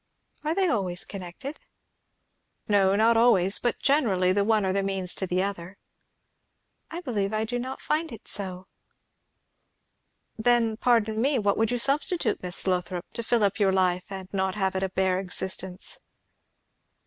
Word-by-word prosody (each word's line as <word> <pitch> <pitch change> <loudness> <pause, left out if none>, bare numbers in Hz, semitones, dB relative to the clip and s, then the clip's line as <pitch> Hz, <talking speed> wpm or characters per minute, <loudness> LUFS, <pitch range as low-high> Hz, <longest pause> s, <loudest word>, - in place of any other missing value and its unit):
"Are 310 +2 -1
they 385 -1 +2
always 190 - -1
connected?" 195 - -8 1.1
"Not 205 +3 +3
always; 200 -5 +4
but 240 - -1
generally, 210 -11 +2
the 200 +1 +2
one 215 -1 +2
are 190 - 0
the 200 - +1
means 195 -2 0
to 190 - -3
the 180 +1 0
other." 195 -1 -5 1.1
"I 340 +2 -6
believe 215 - -2
I 215 0 0
do 245 +2 -3
not 260 +2 -5
find 315 +1 -1
it 225 - -11
so." 185 -2 -2 1.7
"Then, 230 -1 +3
pardon 220 -2 +1
me, 275 +2 +2
what 205 -3 +1
would 225 -1 +1
you 245 - 0
substitute, 285 +8 +1
Miss 180 0 -2
Lothrop, 180 -1 -1
to - - -3
fill 230 -1 +1
up 200 +1 +1
your 195 -2 +3
life, 185 -1 +1
and 190 -1 -6
not 190 -1 -1
have 190 -2 -1
it 190 - -1
a 190 - -1
bare 185 0 0
existence?" 190 0 -3
200 Hz, 160 wpm, -26 LUFS, 190-235 Hz, 1.7 s, always